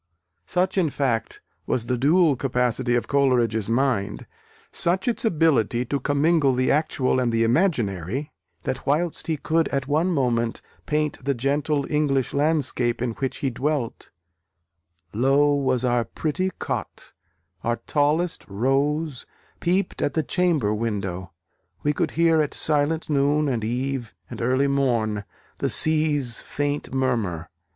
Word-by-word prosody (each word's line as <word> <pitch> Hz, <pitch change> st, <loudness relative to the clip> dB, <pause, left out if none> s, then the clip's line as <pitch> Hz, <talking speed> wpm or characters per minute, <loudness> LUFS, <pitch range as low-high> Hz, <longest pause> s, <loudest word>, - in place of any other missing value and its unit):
Such, 185 Hz, +2 st, +1 dB
in 170 Hz, -4 st, +2 dB
fact, 130 Hz, -6 st, -2 dB, 0.3 s
was 115 Hz, -, -1 dB
the 125 Hz, -, 0 dB
dual 150 Hz, +4 st, +4 dB
capacity 125 Hz, -1 st, 0 dB
of 120 Hz, -, -1 dB
Coleridge's 120 Hz, -6 st, +2 dB
mind, 115 Hz, -, 0 dB, 0.5 s
such 185 Hz, +5 st, -1 dB
its 240 Hz, +2 st, 0 dB
ability 150 Hz, -, +2 dB
to 140 Hz, +3 st, -2 dB
commingle 145 Hz, 0 st, +2 dB
the 130 Hz, +1 st, +2 dB
actual 140 Hz, -4 st, +1 dB
and 125 Hz, -2 st, +1 dB
the 115 Hz, 0 st, +2 dB
imaginary, 120 Hz, -, 0 dB, 0.3 s
that 130 Hz, +2 st, -4 dB
whilst 155 Hz, +4 st, 0 dB
he 160 Hz, -2 st, 0 dB
could 160 Hz, +3 st, +1 dB
at 135 Hz, -1 st, -2 dB
one 155 Hz, +5 st, +2 dB
moment 120 Hz, -7 st, 0 dB, 0.2 s
paint 150 Hz, -2 st, -1 dB
the 140 Hz, +1 st, 0 dB
gentle 140 Hz, +3 st, 0 dB
English 145 Hz, -4 st, 0 dB
landscape 135 Hz, -5 st, +1 dB
in 120 Hz, -1 st, -1 dB
which 130 Hz, +3 st, -3 dB
he 135 Hz, -, +1 dB
dwelt, 135 Hz, -1 st, -2 dB, 1.0 s
Low 135 Hz, +6 st, +3 dB
was 130 Hz, -3 st, +1 dB
our 120 Hz, -1 st, +2 dB
pretty 165 Hz, +9 st, -2 dB
Cot; -, -, -5 dB, 0.5 s
our 120 Hz, 0 st, +1 dB
tallest 155 Hz, +4 st, +1 dB
Rose 135 Hz, +6 st, -1 dB, 0.3 s
Peeped 185 Hz, +3 st, 0 dB
at -, -, -1 dB
the 160 Hz, -, +1 dB
chamber 160 Hz, -, +1 dB
window. 100 Hz, -5 st, -3 dB, 0.5 s
We 150 Hz, -, +2 dB
could -, -, 0 dB
hear 165 Hz, -1 st, +4 dB
At 150 Hz, -, -2 dB
silent 155 Hz, +1 st, +1 dB
noon, 145 Hz, +1 st, +2 dB
and 120 Hz, -5 st, -1 dB
eve, 125 Hz, -2 st, -3 dB, 0.2 s
and -, -, -6 dB
early 130 Hz, +4 st, +2 dB
morn, 120 Hz, -7 st, 0 dB, 0.3 s
The -, -, 0 dB
Sea's 150 Hz, -6 st, +2 dB
faint 145 Hz, 0 st, -3 dB
murmur. 115 Hz, -11 st, -1 dB
135 Hz, 140 wpm, -24 LUFS, 120-150 Hz, 1.0 s, dual